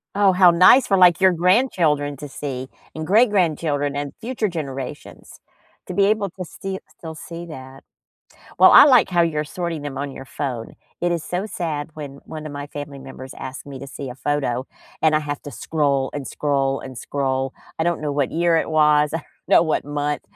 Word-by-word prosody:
Oh, 200 Hz, -2 st, +5 dB
how 180 Hz, -1 st, +6 dB
nice 185 Hz, +10 st, +6 dB
for 195 Hz, -, +3 dB
like 180 Hz, -1 st, +6 dB
your 190 Hz, -1 st, +6 dB
grandchildren 170 Hz, -, +2 dB
to 145 Hz, -, -7 dB
see, 130 Hz, -2 st, -5 dB, 0.3 s
and 160 Hz, 0 st, -4 dB
great 220 Hz, +6 st, +5 dB
grandchildren, 155 Hz, -6 st, 0 dB
and 145 Hz, -1 st, -4 dB
future 235 Hz, -2 st, -2 dB
generations 140 Hz, -5 st, -7 dB, 0.5 s
to 180 Hz, -, -6 dB
be 195 Hz, +2 st, +3 dB
able 205 Hz, -2 st, +1 dB
to 185 Hz, -1 st, -7 dB
sti 190 Hz, +3 st, -6 dB, 0.2 s
still 160 Hz, -1 st, -8 dB
see 170 Hz, +2 st, -8 dB
that. 130 Hz, -3 st, -11 dB, 0.8 s
Well, -, -, +8 dB
I -, -, +10 dB
like 255 Hz, -6 st, +5 dB
how 175 Hz, -1 st, +2 dB
you're 155 Hz, -2 st, 0 dB
sorting 170 Hz, 0 st, -4 dB
them 145 Hz, -2 st, -6 dB
on 140 Hz, 0 st, -3 dB
your 135 Hz, -, -9 dB
phone. 125 Hz, -6 st, -5 dB, 0.3 s
It 175 Hz, 0 st, +1 dB
is 170 Hz, -2 st, -2 dB
so 185 Hz, +4 st, -3 dB
sad 160 Hz, -6 st, -4 dB
when 145 Hz, -3 st, -7 dB
one 155 Hz, -1 st, -8 dB
of 145 Hz, -, -7 dB
my 145 Hz, 0 st, -6 dB
family 145 Hz, -1 st, -8 dB
members 135 Hz, -1 st, -10 dB
asked 135 Hz, +2 st, -7 dB
me 135 Hz, -2 st, -8 dB
to 140 Hz, -, -8 dB
see 135 Hz, 0 st, -7 dB
a -, -, -7 dB
photo 130 Hz, -2 st, -2 dB, 0.4 s
and 155 Hz, -1 st, +4 dB
I -, -, +4 dB
have 145 Hz, -1 st, -4 dB
to 145 Hz, -, -8 dB
scroll, 140 Hz, -4 st, -1 dB
and 145 Hz, -2 st, -5 dB
scroll, 135 Hz, -2 st, -1 dB
and 130 Hz, -2 st, -9 dB
scroll. 135 Hz, 0 st, -2 dB, 0.3 s
I 160 Hz, -, 0 dB
don't 170 Hz, -2 st, 0 dB
know 145 Hz, -1 st, -1 dB
what 140 Hz, -2 st, 0 dB
year 170 Hz, 0 st, +2 dB
it 160 Hz, -, 0 dB
was, 150 Hz, -1 st, +4 dB
I -, -, +1 dB
don't -, -, -13 dB, 0.2 s
know -, -, +6 dB
what 160 Hz, -4 st, 0 dB
month, 145 Hz, 0 st, -2 dB
150 Hz, 205 wpm, -22 LUFS, 140-175 Hz, 0.8 s, I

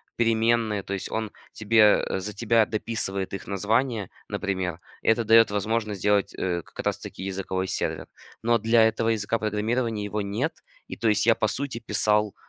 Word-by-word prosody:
переменные. 115 Hz, -2 st, +1 dB
То 100 Hz, -, -5 dB
есть 95 Hz, -, -4 dB
он 110 Hz, -2 st, -2 dB, 0.2 s
тебе, 110 Hz, -1 st, +4 dB
э, -, -, -2 dB
за 105 Hz, +3 st, -5 dB
тебя 115 Hz, +1 st, +3 dB
дописывает 105 Hz, -4 st, -3 dB
их 95 Hz, -2 st, -6 dB
названия, 110 Hz, +2 st, 0 dB, 0.2 s
например. 95 Hz, -4 st, -3 dB, 0.2 s
И -, -, -10 dB
это 115 Hz, +1 st, +3 dB
дает 115 Hz, 0 st, +6 dB
возможность 105 Hz, -1 st, -1 dB
сделать, 105 Hz, -1 st, +2 dB
э, 85 Hz, -2 st, -1 dB
как -, -, -9 dB
раз -, -, 0 dB
таки -, -, -8 dB
языковой 95 Hz, -1 st, -3 dB
сервер. -, -, -3 dB, 0.4 s
Но 120 Hz, 0 st, +3 dB
для 115 Hz, +1 st, +4 dB
этого 110 Hz, 0 st, +1 dB
языка 110 Hz, +1 st, 0 dB
программирования 110 Hz, +1 st, -1 dB
его 105 Hz, +1 st, -2 dB
нет. 110 Hz, +11 st, -2 dB, 0.3 s
И, -, -, -7 dB
то 115 Hz, -, 0 dB
есть 105 Hz, -, +2 dB
я 115 Hz, -1 st, +5 dB
по 110 Hz, -, +1 dB
сути 130 Hz, +2 st, -4 dB
писал 105 Hz, -2 st, +1 dB
105 Hz, 180 wpm, -25 LUFS, 100-115 Hz, 0.4 s, дает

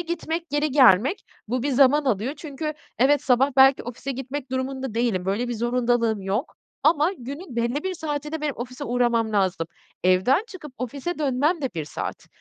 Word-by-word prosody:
gitmek, 340 Hz, -1 st, -4 dB
geri 295 Hz, +1 st, 0 dB
gelmek, 260 Hz, -, +5 dB, 0.2 s
bu 250 Hz, +1 st, -1 dB
bir 285 Hz, -, 0 dB
zaman 280 Hz, +3 st, +4 dB
alıyor. 245 Hz, +2 st, 0 dB
Çünkü, 305 Hz, 0 st, -5 dB, 0.2 s
evet, 280 Hz, +3 st, +4 dB
sabah 265 Hz, +1 st, +3 dB
belki 270 Hz, 0 st, +6 dB
ofise 250 Hz, +3 st, -5 dB
gitmek 265 Hz, +1 st, -6 dB
durumunda 260 Hz, -2 st, -3 dB
değilim, 230 Hz, -6 st, 0 dB
böyle 215 Hz, +6 st, -1 dB
bir 240 Hz, -, -2 dB
zorundalığım 235 Hz, -2 st, +1 dB
yok 200 Hz, -, -2 dB, 0.3 s
ama 310 Hz, +3 st, +3 dB
günün 275 Hz, +2 st, -8 dB
belli 235 Hz, +5 st, 0 dB
bir 375 Hz, 0 st, -2 dB
saatinde 300 Hz, -1 st, -4 dB
benim 300 Hz, -2 st, -1 dB
ofise 250 Hz, +3 st, -6 dB
uğramam 235 Hz, -3 st, +1 dB
lazım. 190 Hz, -5 st, +1 dB, 0.4 s
Evden 190 Hz, -, +3 dB
çıkıp 325 Hz, -8 st, -10 dB
ofise 280 Hz, +7 st, -4 dB
dönmem 295 Hz, +3 st, +1 dB
de 265 Hz, -, -1 dB
1 160 Hz, -, -3 dB
saat. 150 Hz, -, -6 dB
265 Hz, 170 wpm, -24 LUFS, 235-295 Hz, 0.4 s, belki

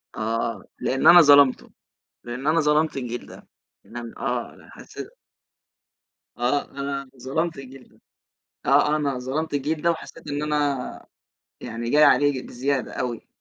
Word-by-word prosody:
آه، 115 Hz, +1 st, -2 dB, 0.2 s
لإن 135 Hz, +4 st, +1 dB
أنا 175 Hz, 0 st, +10 dB
ظلمته، 145 Hz, -3 st, +5 dB, 0.5 s
لإن 125 Hz, +4 st, -6 dB
أنا 165 Hz, +2 st, +3 dB
ظلمت 150 Hz, 0 st, +2 dB
الجيل 120 Hz, -2 st, -5 dB
ده، -, -, -14 dB, 0.4 s
لإن -, -, -11 dB
أن 115 Hz, -1 st, -7 dB
آه -, -, -4 dB
حاسي -, -, -10 dB, 1.3 s
آه، 125 Hz, +4 st, 0 dB
أنا 140 Hz, -1 st, -5 dB
ظلمت 160 Hz, +5 st, -2 dB
الجيل 135 Hz, -1 st, -11 dB
ده، -, -, -27 dB, 0.7 s
آه -, -, -4 dB, 0.3 s
آه، -, -, +2 dB
أنا 140 Hz, -4 st, -1 dB
ظلمت 145 Hz, +5 st, -3 dB
الجيل 150 Hz, +3 st, -2 dB
ده 170 Hz, -, +3 dB
وحسيت 165 Hz, 0 st, -7 dB
إن 145 Hz, +1 st, -2 dB
أنا 145 Hz, -3 st, -2 dB, 0.5 s
يعني 115 Hz, +1 st, -5 dB
جاي 150 Hz, +1 st, +6 dB
عليه 145 Hz, 0 st, +5 dB
ج -, -, -11 dB
بزيادة 135 Hz, +1 st, -2 dB
أوي. 120 Hz, -2 st, -4 dB
140 Hz, 150 wpm, -24 LUFS, 125-150 Hz, 1.3 s, أنا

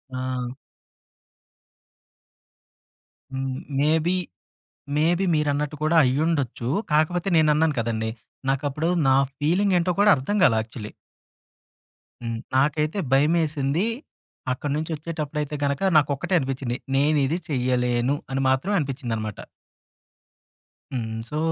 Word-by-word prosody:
ఆ! 130 Hz, -1 st, -3 dB, 2.8 s
హ్మ్. 130 Hz, 0 st, -3 dB, 0.2 s
Maybe, 160 Hz, +4 st, +2 dB, 0.8 s
maybe 170 Hz, +5 st, +2 dB
మీరన్నట్టు 150 Hz, 0 st, 0 dB
కూడా 155 Hz, +2 st, +2 dB
అయ్యుండొచ్చు. 135 Hz, -3 st, 0 dB, 0.2 s
కాకపోతే 170 Hz, +5 st, +2 dB
నేనన్నాను 155 Hz, 0 st, +3 dB
కదండీ. 110 Hz, -1 st, -2 dB, 0.4 s
నాకప్పుడు 145 Hz, +4 st, -1 dB, 0.2 s
నా 130 Hz, -, +5 dB, 0.2 s
ఫీలింగ్ 180 Hz, +6 st, +2 dB
ఏంటో 180 Hz, +1 st, +1 dB
కూడా 210 Hz, 0 st, +6 dB
అర్థం 140 Hz, +11 st, -2 dB
గాలా. 115 Hz, -9 st, +5 dB
యాక్చువల్‌లీ. 110 Hz, -1 st, -9 dB, 1.3 s
హ్మ్. 115 Hz, -1 st, -3 dB, 0.2 s
నాకైతే 150 Hz, +6 st, +1 dB
భయమేసింది. 150 Hz, +3 st, +2 dB, 0.7 s
అక్కడ్నుంచి 150 Hz, +5 st, -3 dB
ఒచ్చేటప్పుడైతే 150 Hz, -2 st, -4 dB
గనక 140 Hz, +2 st, 0 dB, 0.2 s
నాకొక్కటే 145 Hz, +4 st, +1 dB
అనిపిచ్చింది. 130 Hz, -3 st, -3 dB, 0.2 s
నేనిది 145 Hz, +2 st, +2 dB
చెయ్యలేను 125 Hz, 0 st, +1 dB, 0.2 s
అని 135 Hz, -, 0 dB
మాత్రం 135 Hz, +10 st, +1 dB
అనిపిచ్చిందనమాట. 120 Hz, -, -3 dB, 1.5 s
హ్మ్. 110 Hz, -3 st, -3 dB
సో, 150 Hz, -, -3 dB
145 Hz, 90 wpm, -24 LUFS, 130-155 Hz, 2.8 s, కూడా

